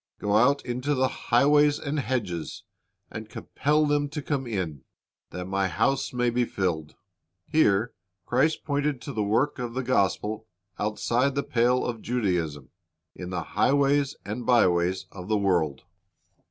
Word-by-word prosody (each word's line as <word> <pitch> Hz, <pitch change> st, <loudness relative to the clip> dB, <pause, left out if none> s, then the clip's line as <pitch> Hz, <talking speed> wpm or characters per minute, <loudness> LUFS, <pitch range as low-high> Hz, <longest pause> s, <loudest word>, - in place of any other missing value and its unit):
Go 105 Hz, 0 st, 0 dB
out 135 Hz, +6 st, +3 dB
into 125 Hz, +4 st, -1 dB
the 130 Hz, 0 st, +2 dB, 0.2 s
highways 145 Hz, +4 st, +5 dB
and 145 Hz, +1 st, -3 dB
hedges, 110 Hz, -, -3 dB, 0.5 s
and -, -, -7 dB
compel 150 Hz, +2 st, 0 dB
them 145 Hz, -1 st, +1 dB
to 150 Hz, 0 st, -5 dB
come 135 Hz, -3 st, -2 dB
in, 90 Hz, -, -3 dB, 0.5 s
that 90 Hz, 0 st, -6 dB
my 95 Hz, +1 st, 0 dB
house 135 Hz, +11 st, 0 dB
may 125 Hz, -1 st, +1 dB
be 125 Hz, +1 st, +1 dB
filled." 85 Hz, -9 st, -2 dB, 0.5 s
Here 110 Hz, -7 st, +2 dB, 0.3 s
Christ 145 Hz, +6 st, +1 dB
pointed 145 Hz, -2 st, -1 dB
to 140 Hz, -, -6 dB
the 110 Hz, -, -1 dB
work 115 Hz, +9 st, +1 dB
of 120 Hz, -1 st, -4 dB
the 130 Hz, -, -1 dB
gospel 110 Hz, -2 st, 0 dB, 0.3 s
outside 120 Hz, +6 st, 0 dB
the 140 Hz, -, 0 dB
pale 125 Hz, +1 st, +2 dB
of 115 Hz, -3 st, -4 dB
Judaism, 90 Hz, -, -2 dB, 0.4 s
in 90 Hz, -1 st, -7 dB
the 90 Hz, -2 st, -3 dB
highways 140 Hz, -, +2 dB
and 110 Hz, +4 st, -4 dB
byways 90 Hz, -7 st, +2 dB
of 90 Hz, -2 st, -9 dB
the 110 Hz, 0 st, +2 dB
world. 85 Hz, -9 st, 0 dB
120 Hz, 150 wpm, -26 LUFS, 95-140 Hz, 0.5 s, highways